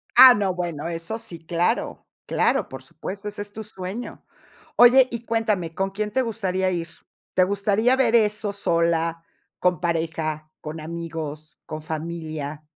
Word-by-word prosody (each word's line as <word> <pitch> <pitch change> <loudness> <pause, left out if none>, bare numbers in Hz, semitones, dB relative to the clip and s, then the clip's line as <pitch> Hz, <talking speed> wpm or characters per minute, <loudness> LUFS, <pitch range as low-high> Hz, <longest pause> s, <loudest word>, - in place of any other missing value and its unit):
Ah, 260 -1 +11
no, 200 -4 0
bueno, 170 -3 -3
eso 170 +6 -4
sí, 185 -7 -9
claro, 175 +8 -1 0.2
claro, - - +1
por - - -8
supuesto, 200 +2 -7
ese 205 0 -5
es 205 0 -8
tu 220 - -6
sueño. 200 +2 -7 0.5
Oye, 250 +2 +8
y 235 0 -5
cuéntame, 215 -8 0
¿con 195 +3 -1
quién 210 +2 -3
te 260 - +2
gustaría 190 -6 -1
ir? 170 -2 -2 0.5
¿Te 185 - +5
gustaría 200 +5 +2
ver 245 -3 +3
eso 210 -2 +2
sola, 165 -3 +1 0.4
con 180 -2 +2
pareja, 160 -2 -2
con 155 +1 -6
amigos, 155 -2 -6
con 155 0 -6
familia? 155 -2 -5
180 Hz, 150 wpm, -24 LUFS, 165-210 Hz, 0.5 s, Ah